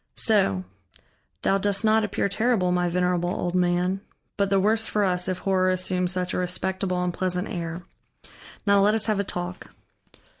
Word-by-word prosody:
"So. 195 - +2 0.8
Thou 195 - +2
dost 200 +2 0
not 220 0 +4
appear 205 -1 -1
terrible, 210 -2 +1
my 180 0 +1
venerable 180 0 0
old 175 -1 -2
man. 180 +1 +1 0.3
But 200 -1 0
the 195 0 +3
worse 220 +3 +2
for 210 - 0
us, 180 -2 +1
if 185 -1 -1
horror 185 -1 +1
assumes 185 -1 0
such 180 -1 -2
a - - -1
respectable 180 0 -1
and 180 -1 -1
pleasant 180 +1 -1
air. 170 -2 -5 0.8
Now 200 -1 +4
let 210 +2 +4
us 220 - +1
have 215 -2 0
a - - +1
talk." 180 -1 -5
185 Hz, 175 wpm, -25 LUFS, 180-200 Hz, 0.8 s, not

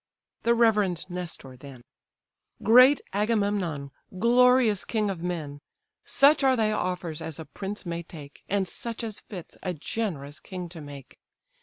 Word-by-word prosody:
The 235 0 +3
reverend 210 -7 +2
Nestor 170 -7 -6
then: 130 -1 -12 0.8
"Great 255 +5 +7
Agamemnon! 200 -9 0 0.3
glorious 240 -1 +4
king 215 -3 -1
of 175 -4 -6
men! 160 -5 -4 0.5
Such 280 +1 +4
are 265 -1 +5
thy 220 -3 +1
offers 180 -6 -2
as 160 -2 -5
a 160 - -7
prince 195 +8 -6
may 170 -1 -3
take, 150 -4 -12
And 195 -1 +1
such 230 +5 -4
as 220 -3 -4
fits 180 -6 -10
a 180 -2 -3
generous 150 -5 -4
king 180 -2 -7
to 165 -2 -10
make. 140 -3 -11
185 Hz, 145 wpm, -27 LUFS, 160-225 Hz, 0.8 s, Great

